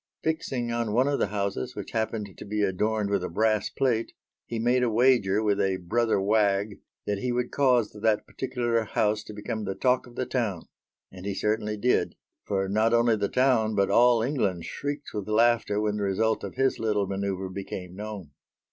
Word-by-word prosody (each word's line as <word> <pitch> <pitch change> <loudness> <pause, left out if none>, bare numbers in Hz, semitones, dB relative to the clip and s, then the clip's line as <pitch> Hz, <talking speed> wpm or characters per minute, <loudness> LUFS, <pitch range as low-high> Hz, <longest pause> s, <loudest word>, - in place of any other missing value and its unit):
Fixing 135 -7 -1
on 115 -2 -1
one 125 +4 +3
of 145 -1 0
the - - +2
houses, 100 -9 -3
which - - -7
happened 110 -3 -3
to - - -9
be 105 0 -1
adorned 105 +2 0
with 100 -3 +1
a - - -3
brass 110 +3 +1
plate, 120 -4 0 0.3
he 115 - -4
made 120 +3 +2
a 125 - +2
wager 110 -3 +3
with 105 -1 +2
a 95 -1 +1
brother 110 +4 +1
wag 100 0 +1 0.3
that 100 -1 -1
he 125 +4 -1
would 120 0 -1
cause 125 -6 +3
that 105 0 0
particular 120 -3 -1
house 105 0 0
to - - -9
become 105 +1 -4
the 95 -1 -3
talk 125 +4 +1
of 120 - -15
the 130 - -2
town: 110 -11 -2 0.5
and 95 +1 -9
he 100 - -2
certainly 105 +1 -1
did 125 +4 +1 0.3
for 95 -1 0
not 110 +4 +2
only 115 -1 +4
the 100 -2 -1
town, 125 -4 +2
but 100 -1 +2
all 120 -1 +5
England 105 - -1
shrieked 145 0 -5
with 105 -2 -4
laughter 115 -1 +3
when 105 0 0
the 105 - -2
result 110 +3 +1
of - - -6
his 135 +1 +1
little 105 -3 0
manœuvre 95 -1 -3
became 90 -2 -6
known. 105 -6 -7
110 Hz, 195 wpm, -27 LUFS, 100-120 Hz, 0.5 s, all